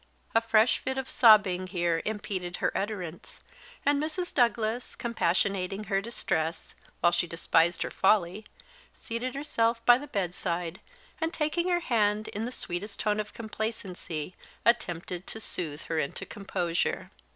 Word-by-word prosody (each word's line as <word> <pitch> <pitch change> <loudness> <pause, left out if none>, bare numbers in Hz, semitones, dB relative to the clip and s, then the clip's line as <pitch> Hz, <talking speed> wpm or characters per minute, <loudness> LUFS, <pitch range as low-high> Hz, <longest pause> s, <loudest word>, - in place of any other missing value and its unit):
A 225 - +5
fresh 225 0 +4
fit 265 0 -3
of 265 0 -2
sobbing 205 -6 +5
here 175 -3 0
impeded 190 -4 -3
her - - 0
utterance; 185 -5 -4 0.5
and 285 0 +3
Mrs. 335 +4 -3
Douglas, 235 -1 +1
compassionating 195 -2 0
her 195 0 +2
distress, 165 -7 -2 0.3
while 175 - +5
she 175 - +1
despised 165 +1 +2
her - - -4
folly, 195 +1 +2 0.5
seated 245 +3 -4
herself 230 -5 0
by 245 0 +8
the 290 - -8
bedside, 180 - -2 0.4
and 325 0 +1
taking 335 +2 0
her 350 -1 +2
hand, 215 -6 +1
in 215 +2 -3
the 245 - -4
sweetest 200 -2 -4
tone 210 -1 +1
of 210 0 -4
complacency 210 -7 -4 0.3
attempted 180 -5 0
to 220 - -5
soothe 160 -8 -4
her 160 -1 -1
into 140 - -3
composure. 185 -4 -2
210 Hz, 140 wpm, -29 LUFS, 175-235 Hz, 0.5 s, by